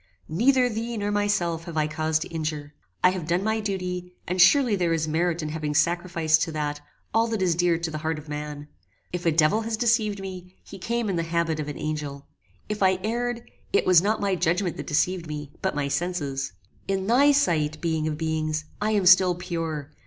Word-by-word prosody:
"Neither 250 - +3
thee 230 0 -3
nor 205 0 -1
myself 205 -5 0
have 170 -3 -6
I 155 - +3
cause 155 +1 0
to 155 - -4
injure. 155 -2 -4 0.3
I 180 - +6
have 180 -4 -5
done 175 +3 +1
my 220 +1 0
duty, 180 -3 -4
and 180 +1 +1
surely 240 +4 +6
there 175 -3 +1
is 160 -1 0
merit 170 +1 0
in 155 - -3
having 150 -1 -3
sacrificed 170 0 +2
to 165 - -1
that, 150 -1 -3 0.3
all 225 +1 +3
that 220 -4 -1
is 175 -2 +3
dear 175 0 +2
to 165 -1 -3
the 155 - -4
heart 160 +1 -2
of 155 +1 -10
man. 150 0 -6 0.5
If 175 -1 -2
a - - +5
devil 160 +7 +3
has 225 0 -2
deceived 220 -3 +1
me, 185 -1 -8
he 195 - -11
came 235 +3 -1
in 190 -3 -1
the - - +1
habit 165 -1 -1
of 150 - -3
an 145 - -5
angel. 150 -2 -4 0.4
If 210 -1 -4
I 190 -1 +4
erred, 235 +2 -2 0.3
it - - +2
was 180 -3 +6
not 215 +3 +1
my 200 -1 0
judgment 175 +1 0
that - - -6
deceived 175 +2 0
me, 150 -2 -6
but - - -1
my 145 -1 -1
senses. 140 - -2 0.3
In 195 -1 -1
thy 265 +7 +5
sight, 155 - +1
being 160 -2 -1
of 150 -1 -2
beings! 155 -1 -1 0.2
I 215 +1 +1
am 200 -3 +1
still 180 0 +6
pure. 165 -5 -4
175 Hz, 210 wpm, -25 LUFS, 155-200 Hz, 0.5 s, I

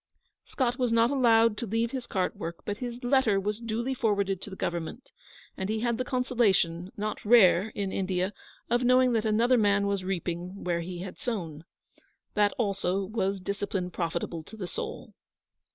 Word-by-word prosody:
Scott 250 -2 -1
was 250 -2 +1
not 230 +2 +4
allowed 230 -5 +4
to 235 - -4
leave 225 +3 0
his 260 -3 -5
cart 185 -3 -1
work, 165 +1 -7
but 205 0 -3
his 245 +1 -6
letter 245 -5 +3
was 210 +2 -2
duly 235 +3 -2
forwarded 200 -5 0
to - - -7
the 190 - -8
Government, 170 +7 -4 0.4
and 190 +1 -4
he 220 0 -1
had 235 -1 0
the - - +1
consolation, 205 -9 +1
not 210 0 -3
rare 205 -4 +6
in 200 -2 -2
India, 185 +1 -1 0.3
of 240 +2 +1
knowing 255 0 +4
that 225 -1 +1
another 230 +3 +3
man 205 -1 +3
was 200 -1 -1
reaping 180 0 -4
where 175 -1 0
he 175 +1 -6
had 185 0 -8
sown. 165 -10 -4 0.7
That 205 -1 +3
also 195 -3 0
was 195 -1 -1
discipline 195 -1 -3
profitable 170 -1 -3
to 220 - -11
the 195 - -4
soul. 175 - -6
205 Hz, 175 wpm, -28 LUFS, 185-235 Hz, 0.7 s, rare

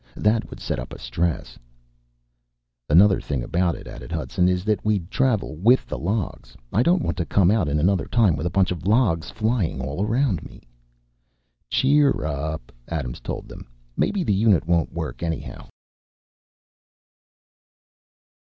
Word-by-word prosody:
That 110 +2 +1
would - - -10
set - - -3
up - - -7
a - - -7
stress...." 85 -1 -3 1.3
"Another 95 +5 +5
thing 70 -4 -3
about 85 +5 0
it," - - -11
added - - -9
Hudson, 90 0 0
"is 90 0 -1
that 105 -1 0
we'd 100 -4 -1
travel 120 - 0
with 115 +9 +4
the - - -5
logs. 90 - -3 0.2
I 110 - +3
don't 175 +6 +3
want 85 - -2
to 90 - 0
come 95 -2 +4
out 105 -7 +2
in 75 - 0
another 90 +4 +1
time 110 -9 +3
with 75 +4 -2
a - - 0
bunch 95 +1 +2
of 90 0 -4
logs 100 -8 +2
flying 110 - -1
all 70 +8 -3
around 115 - +1
me." - - -13 1.1
"Cheer 135 - +3
up," 75 -2 -4 0.2
Adams 70 -7 -4
told - - -6
them. - - -11 0.3
"Maybe 200 -3 0
the 105 - +1
unit 100 -4 +3
won't 85 -1 +1
work, 85 -2 -5
anyhow." 80 -1 -5
90 Hz, 155 wpm, -23 LUFS, 80-110 Hz, 1.3 s, Another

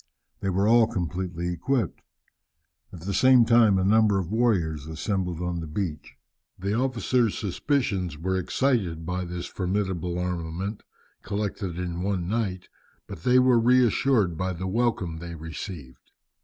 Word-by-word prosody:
They 95 - -2
were 95 +2 +1
all 115 0 +6
completely 90 -2 -3
equipped. 120 - -1 0.9
At 85 - -10
the 100 +3 -3
same 130 +3 +6
time 115 -4 +5
a 95 - +1
number 105 0 +4
of 95 -1 -3
warriors 90 - +1
assembled 90 +1 -2
on 90 -1 -2
the 80 - -5
beach. 80 -1 -4 0.4
The 100 +2 -2
officers' 125 -2 +1
suspicions 100 - -1
were 95 +4 -1
excited 95 -5 0
by 90 +1 -2
this 90 0 -5
formidable 90 -2 -2
armament, 90 +3 -3 0.4
collected 100 -3 -3
in 90 -1 -3
one 95 -3 -1
night, 100 -4 -2 0.4
but 100 -5 -9
they 125 +7 +4
were 125 -2 +5
reassured 120 -5 +3
by 95 0 -1
the 90 +2 -5
welcome 95 -5 0
they 85 0 -7
received. 80 -4 -8
95 Hz, 140 wpm, -26 LUFS, 85-110 Hz, 0.9 s, all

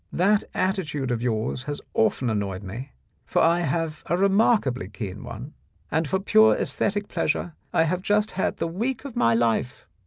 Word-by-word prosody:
That 200 +3 +3
attitude 150 -9 -1
of 120 -2 -1
yours 115 0 -1
has 145 - -3
often 125 +3 +2
annoyed 100 -2 -2
me, 115 +8 -7 0.3
for - - 0
I 170 +1 +4
have 160 -1 -1
a 175 - +1
remarkably 195 - +2
keen 100 -1 -6
one, 120 +6 -8 0.4
and 160 0 +1
for 165 - +1
pure 215 +2 +5
aesthetic 205 0 -1
pleasure 175 - -1 0.2
I 165 - +3
have 175 +3 -1
just 210 +2 +1
had 190 - -1
the - - -1
week 230 +11 -2
of 265 -4 -7
my 115 - +3
life. 115 +2 0
160 Hz, 175 wpm, -25 LUFS, 120-195 Hz, 0.4 s, pure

